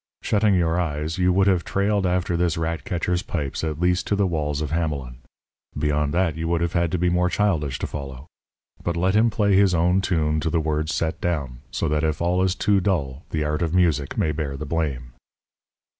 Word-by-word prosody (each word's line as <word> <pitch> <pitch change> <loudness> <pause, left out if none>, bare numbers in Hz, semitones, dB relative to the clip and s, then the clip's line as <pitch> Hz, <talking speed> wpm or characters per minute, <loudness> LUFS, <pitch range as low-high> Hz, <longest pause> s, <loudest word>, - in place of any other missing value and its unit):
Shutting 105 -1 +2
your 85 -1 +1
eyes, 80 0 -3
you 90 0 +3
would 95 +1 +3
have 95 -4 +2
trailed 100 0 0
after 90 -1 0
this 85 -1 +1
rat 80 0 -2
catcher's 90 0 -1
pipes 75 -7 -4
at 80 -1 -2
least 90 +1 +1
to 105 - +1
the 100 0 +2
walls 75 -5 -1
of 75 -2 -3
Hamelin. 75 -7 -2 0.6
Beyond 75 -1 0
that 90 -3 +1
you 80 +1 -3
would 85 0 0
have 85 +1 -1
had 85 -2 +1
to - - +2
be 90 +1 +1
more 90 +1 +2
childish 80 -10 0
to - - -3
follow. 70 -2 -7 0.6
But 85 0 -1
let 95 +3 +1
him 115 +2 +4
play 105 -2 +2
his 95 -2 +4
own 90 +3 +3
tune 80 -5 0
to 80 - -1
the 85 - +1
words 80 0 -1
set 80 +3 -2
down, 70 -8 -2
so - - -2
that 75 0 0
if 80 -1 0
all 90 +2 +1
is 95 0 +1
too 100 +1 +2
dull, 80 -8 -1
the 80 -1 -1
art 75 +1 -1
of 85 0 0
music 80 -6 +1
may 80 - +1
bear 75 -3 -3
the 75 - -5
blame. 70 -6 -3
85 Hz, 220 wpm, -23 LUFS, 75-90 Hz, 0.6 s, him